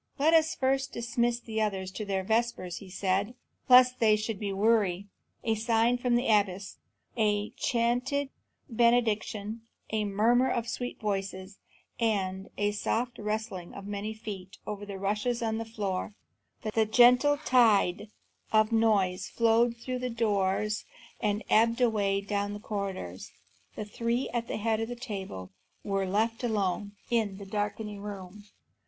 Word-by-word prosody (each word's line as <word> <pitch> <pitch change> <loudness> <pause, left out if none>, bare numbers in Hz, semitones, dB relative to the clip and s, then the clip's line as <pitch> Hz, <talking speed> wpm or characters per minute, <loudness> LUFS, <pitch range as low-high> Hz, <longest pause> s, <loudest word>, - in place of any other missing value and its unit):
"Let 310 +3 +3
us 320 -1 +4
first 270 0 0
dismiss 235 0 0
the 220 -2 -3
others 190 -3 -1
to 215 +2 -5
their 195 -1 -1
vespers," 220 -4 -1
said 195 +1 0
he, 245 - -14 0.3
"lest 250 0 +7
they 215 -2 +5
should 215 -1 -3
be 205 -2 -2
weary." 200 -2 +2 0.4
A 225 - +1
sign 230 +2 +2
from 245 -1 +1
the 245 +2 +1
abbess; 200 -3 +1 0.4
a 210 -2 +1
chanted 250 +4 0 0.4
benediction; 225 -3 +1 0.3
a 215 -1 0
murmuring 235 +6 +3
of 235 0 -2
sweet 245 +1 -4
voices 195 -2 -4 0.4
and 195 -4 -1
a 205 0 +1
soft 235 +3 -2
rustling 210 -4 -4
of 200 - -8
many 205 +1 -4
feet 200 -4 -8
over 205 -1 -5
the 200 -1 -6
rushes 210 +5 -1
on 220 0 -1
the 225 - -4
floor; 205 -3 -3 0.6
the 220 -1 +2
gentle 250 +6 +6
tide 220 -8 +3 0.4
of 215 0 +4
noise 200 -5 +2
flowed 230 +1 +3
out 230 - -24
through 255 0 -3
the 250 0 -2
doors 210 -2 0 0.4
and 210 0 0
ebbed 230 +2 +3
away 205 -5 +2
down 205 0 -2
the 205 - -6
corridors; 195 - -5 0.4
the 215 - -4
three 235 +4 -1
at 235 -1 -2
the - - -3
head 220 0 0
of 225 +1 -2
the 245 - -4
table 195 - -6 0.3
were 195 -1 -1
left 225 +5 0
alone 205 -3 -1 0.2
in 215 -5 +1
the 200 - -9
darkening 205 +1 -3
room. 200 0 -8
215 Hz, 150 wpm, -29 LUFS, 200-235 Hz, 0.6 s, lest